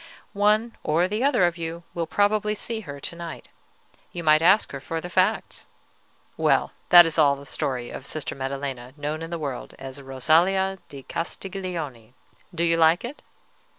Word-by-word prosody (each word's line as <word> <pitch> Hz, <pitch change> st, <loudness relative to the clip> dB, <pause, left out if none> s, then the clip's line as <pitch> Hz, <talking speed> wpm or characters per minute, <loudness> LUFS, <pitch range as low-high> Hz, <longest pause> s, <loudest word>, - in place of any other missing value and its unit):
One 215 Hz, +3 st, +2 dB
or 165 Hz, +4 st, +2 dB
the 210 Hz, +5 st, -2 dB
other 280 Hz, -9 st, +3 dB
of 175 Hz, 0 st, -1 dB
you 165 Hz, +1 st, -5 dB
will 170 Hz, -1 st, -2 dB
probably 210 Hz, +1 st, +1 dB
see 225 Hz, +2 st, -4 dB
her 140 Hz, -9 st, -8 dB
to 170 Hz, -, -5 dB
night. 170 Hz, -1 st, -8 dB, 0.6 s
You 175 Hz, -, -6 dB
might 155 Hz, 0 st, +5 dB
ask 190 Hz, +6 st, +4 dB
her 140 Hz, -, -5 dB
for 160 Hz, +5 st, -4 dB
the 180 Hz, +2 st, -7 dB
facts. -, -, 0 dB, 0.7 s
Well, -, -, +2 dB, 0.2 s
that 175 Hz, -1 st, +10 dB
is 165 Hz, 0 st, 0 dB
all 140 Hz, -2 st, +5 dB
the 140 Hz, 0 st, -12 dB
story 125 Hz, -3 st, -3 dB
of 135 Hz, -, -7 dB
Sister 155 Hz, -, -3 dB
Maddelena, 135 Hz, -1 st, -5 dB
known 150 Hz, +2 st, -3 dB
in 165 Hz, -, -6 dB
the 170 Hz, -, -3 dB
world 140 Hz, -5 st, -5 dB
as 135 Hz, +1 st, -8 dB
Rosalia 170 Hz, +9 st, +2 dB
di 140 Hz, -2 st, -10 dB
Castiglione. 165 Hz, -, -5 dB, 0.4 s
Do 170 Hz, -2 st, -2 dB
you 165 Hz, -1 st, +3 dB
like 165 Hz, +5 st, +4 dB
it?" 270 Hz, +5 st, -8 dB
165 Hz, 175 wpm, -25 LUFS, 140-185 Hz, 0.7 s, that